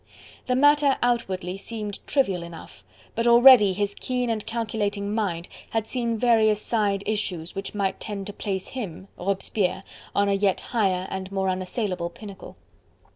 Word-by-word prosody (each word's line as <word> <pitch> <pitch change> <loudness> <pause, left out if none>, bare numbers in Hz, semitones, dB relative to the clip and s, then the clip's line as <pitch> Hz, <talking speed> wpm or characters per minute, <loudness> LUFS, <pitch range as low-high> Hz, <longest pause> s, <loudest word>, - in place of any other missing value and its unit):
The 250 - +2
matter 290 0 +5
outwardly 190 -7 0
seemed 210 -1 -6
trivial 200 -11 +1
enough, 170 - -11 0.3
but 230 +1 0
already 235 -3 +8
his 205 +1 -1
keen 250 +1 -2
and 215 -2 -2
calculating 210 -3 -2
mind 185 -6 -2 0.2
had 225 -1 -1
seen 235 -1 -2
various 220 -3 +4
side 205 -3 0
issues 185 -6 -2
which 195 +2 -6
might 195 -2 -1
tend 200 -2 -5
to 205 - -7
place 195 -2 -3
him 195 -7 -6
Robespierre 195 0 -1 0.3
on 200 0 +3
a 200 - +2
yet 195 -1 +2
higher 190 -6 0
and 190 0 -5
more 190 -1 0
unassailable 185 -1 -2
pinnacle. 200 +2 -11
205 Hz, 150 wpm, -25 LUFS, 190-230 Hz, 0.3 s, already